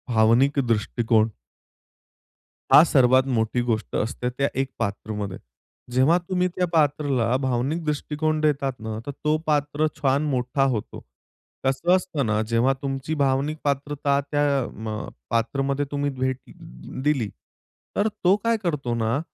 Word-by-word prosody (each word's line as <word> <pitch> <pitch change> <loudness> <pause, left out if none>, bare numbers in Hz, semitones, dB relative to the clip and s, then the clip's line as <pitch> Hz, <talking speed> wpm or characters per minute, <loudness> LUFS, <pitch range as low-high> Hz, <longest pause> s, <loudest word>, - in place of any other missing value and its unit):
भावनिक 120 +6 +4
दृष्टिकोन 115 0 +2 1.4
हा 150 - +10
सर्वात 130 -4 +4
मोठी 110 +2 +1
गोष्ट 115 -2 -2
असते, 125 +3 -1
त्या 140 +3 -1
एक 135 -1 -4
पात्रामध्ये 105 -2 -3 0.5
जेव्हा 130 +7 +4
तुम्ही 180 -1 +1
त्या 180 - +1
पात्राला 145 -7 +1
भावनिक 130 +6 -1
दृष्टिकोन 155 +1 -1
देतात 145 -3 +1
ना, 110 0 -5
तर 145 - -4
तो 150 +2 0
पात्र 145 0 +1
छान 140 0 +2
मोठा 125 +2 0
होतो. 110 -4 -4 0.6
कसं 135 +7 +2
असतं 180 -7 -1
ना 110 0 +1
जेव्हा 115 +4 +2
तुमची 135 +2 -3
भावनिक 140 +3 +1
पात्रता 140 0 0
त्या 145 -1 +2 0.3
म 110 - -7
अ, 110 0 -4 0.2
पात्रामध्ये 135 +5 0
तुम्ही 145 0 -1
भेट 130 0 0
अ, - - -12 0.5
दिली 135 -8 +1 0.7
तर 205 - +2
तो 190 -3 +2
काय 230 0 +2
करतो 145 -8 -1
ना, 115 +3 0
135 Hz, 135 wpm, -24 LUFS, 120-150 Hz, 1.4 s, हा